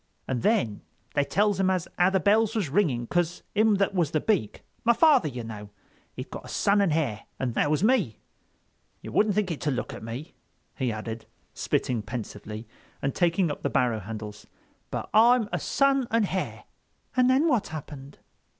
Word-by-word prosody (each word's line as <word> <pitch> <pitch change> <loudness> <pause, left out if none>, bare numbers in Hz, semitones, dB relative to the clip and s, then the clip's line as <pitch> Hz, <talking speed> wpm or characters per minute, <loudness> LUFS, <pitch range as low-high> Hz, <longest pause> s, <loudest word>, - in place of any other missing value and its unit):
And 125 -3 -1
then 190 - +1 0.3
they 145 - +2
tells 205 +6 +1
him 190 -1 +3
as 185 -2 0
how 180 +1 +4
the 190 0 +2
bells 215 +5 +3
was 200 -9 0
ringing 140 -10 +1
'cause 175 +5 -1
him 215 0 +4
that 195 0 +1
was 175 -6 +1
the 155 - 0
Beak—my 215 - 0
father, 285 - +5
you 125 -4 -5
know—he'd 105 -3 -11
got - - -7
a - - -9
son 200 +1 +2
and 195 -5 +2
hare. 140 -9 -1
And 125 -3 -2
that 145 - +1
was 155 +4 +1
me. 215 - +2 0.9
You - - -7
wouldn't 210 -2 +2
think 205 -4 +1
it 160 - -5
to 150 - 0
look 130 - -3
at - - -8
me," 120 +8 -7 0.4
he 130 -3 -1
added, 110 +1 -6 0.3
spitting 120 -3 -1
pensively 105 -1 -7 0.3
and 135 - -1
taking 170 -1 +2
up - - -6
the - - -1
barrow 120 -4 +1
handles, 105 0 -8 0.4
"but - - -4
I'm 235 +1 +5
a - - 0
son 275 -2 +2
and 230 -1 +2
hare." 185 -1 -3 0.5
"And 255 0 +4
then 270 +5 +4
what 240 -9 +2
happened?" 145 -3 -8
165 Hz, 185 wpm, -27 LUFS, -, 0.9 s, father